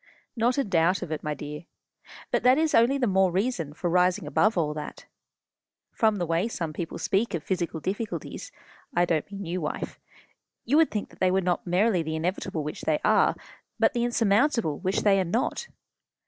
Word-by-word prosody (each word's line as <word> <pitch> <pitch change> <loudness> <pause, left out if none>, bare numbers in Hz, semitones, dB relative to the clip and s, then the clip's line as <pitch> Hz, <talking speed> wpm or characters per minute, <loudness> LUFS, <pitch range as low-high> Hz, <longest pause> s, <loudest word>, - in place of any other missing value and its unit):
"Not 240 +2 +1
a 275 - +2
doubt 180 -2 +2
of 160 - -7
it, 155 - -3
my 150 0 -3
dear. 150 +3 -7 0.7
But - - +1
that 255 +2 +5
is 315 -1 +1
only 240 +4 +4
the 260 - +1
more 190 -3 +3
reason 185 - -1
for 160 +4 -4
rising 180 +3 +2
above 215 -1 +2
all 150 -3 +1
that. 150 -1 -8 0.9
From 220 -3 +2
the 180 -3 -2
way 165 +5 0
some 165 -9 -4
people 165 +1 -5
speak 200 0 0
of 160 - -4
physical 170 -3 -2
difficulties 205 +6 -5 0.4
I 175 - +4
don't 165 +2 -1
mean 200 -1 -6
you, 175 +2 -3
wife 150 - -4 0.7
you 280 +6 +3
would 325 -1 +5
think 210 - -4
that - - -18
they 185 - +3
were 190 +1 +2
not 180 -1 -1
merely 185 +1 +2
the 160 0 -3
inevitable 160 -1 -2
which 150 - -6
they 155 -1 +1
are, - - +4 0.4
but - - +3
the 240 -1 0
insurmountable 230 - +2
which 185 +1 0
they 195 -2 +4
are - - +2
not. 225 +10 -2
185 Hz, 195 wpm, -26 LUFS, 165-225 Hz, 0.9 s, that